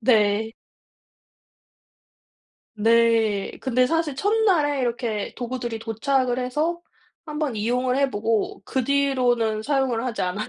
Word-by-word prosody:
네. 220 Hz, -1 st, +2 dB, 2.2 s
네. 225 Hz, -2 st, +3 dB
근데 255 Hz, -1 st, +2 dB
사실 325 Hz, -1 st, 0 dB
첫날에 360 Hz, -6 st, +2 dB
이렇게 235 Hz, -4 st, -2 dB
도구들이 240 Hz, -2 st, -4 dB
도착을 245 Hz, +3 st, 0 dB
해서 305 Hz, +7 st, -1 dB, 0.5 s
1 300 Hz, -1 st, -6 dB
번 290 Hz, -7 st, -1 dB
이용을 250 Hz, +4 st, 0 dB
해 275 Hz, -1 st, +2 dB
보고 220 Hz, 0 st, -1 dB
그 260 Hz, -, -1 dB
뒤로는 245 Hz, -5 st, +1 dB
사용을 265 Hz, -3 st, 0 dB
하지 240 Hz, -4 st, -3 dB
않아요. 185 Hz, +4 st, -2 dB
245 Hz, 230 characters per minute, -23 LUFS, 225-275 Hz, 2.2 s, 네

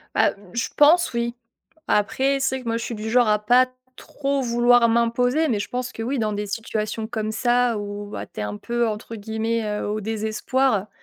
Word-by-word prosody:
Bah, -, -, +3 dB, 0.2 s
je 235 Hz, -, -1 dB
pense, 320 Hz, +3 st, +5 dB
oui. 235 Hz, 0 st, -1 dB, 0.5 s
Après, 265 Hz, +7 st, +1 dB
c'est 265 Hz, 0 st, 0 dB
que -, -, -15 dB
moi, 230 Hz, 0 st, 0 dB
je 230 Hz, -, -4 dB
suis 235 Hz, -, -4 dB
du 215 Hz, +1 st, -5 dB
genre 245 Hz, 0 st, +4 dB
à 210 Hz, 0 st, +3 dB
pas 245 Hz, +5 st, +4 dB, 0.3 s
trop 280 Hz, -1 st, -2 dB
vouloir 240 Hz, -1 st, +4 dB
m'imposer. 245 Hz, +6 st, +2 dB
Mais 225 Hz, -7 st, 0 dB
je 200 Hz, -, -4 dB
pense 250 Hz, 0 st, -3 dB
que 225 Hz, -, -5 dB
oui, 260 Hz, +3 st, -1 dB
dans 215 Hz, -1 st, 0 dB
des 205 Hz, 0 st, -3 dB
situations 220 Hz, +1 st, -3 dB
comme 220 Hz, -2 st, -3 dB
ça 240 Hz, 0 st, +2 dB
où 205 Hz, 0 st, -5 dB
bah, -, -, -6 dB
tu -, -, -11 dB
es -, -, -1 dB
un 105 Hz, 0 st, -4 dB
peu, 235 Hz, -, -1 dB
entre 220 Hz, +1 st, -5 dB
guillemets, 220 Hz, +2 st, -2 dB
heu, 210 Hz, -1 st, -3 dB
«au 210 Hz, +1 st, -2 dB
désespoir», 220 Hz, +1 st, 0 dB
230 Hz, 205 wpm, -23 LUFS, 215-245 Hz, 0.5 s, pense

